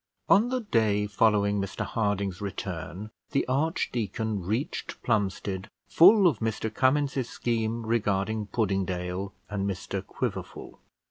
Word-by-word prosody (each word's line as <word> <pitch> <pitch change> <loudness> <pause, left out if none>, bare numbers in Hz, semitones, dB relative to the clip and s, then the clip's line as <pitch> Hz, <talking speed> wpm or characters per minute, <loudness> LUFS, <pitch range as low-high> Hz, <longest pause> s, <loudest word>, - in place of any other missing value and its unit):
On 215 +5 +5
the 255 0 -1
day 110 - +2
following 105 0 +2
Mr 100 0 -3
Harding's 100 -4 -1
return, 95 0 -5 0.2
the 140 - +1
archdeacon 115 - -1
reached 110 - -3
Plumstead 100 -3 -1 0.2
full 195 +4 +7
of 150 - +3
Mr 110 -1 -2
Cummins's 135 0 +1
scheme 115 -2 -1
regarding 105 -1 0
Puddingdale 95 -3 -1 0.2
and 100 -1 -2
Mr 95 -2 -4
Quiverful. - - -5
110 Hz, 115 wpm, -27 LUFS, 100-120 Hz, 0.2 s, full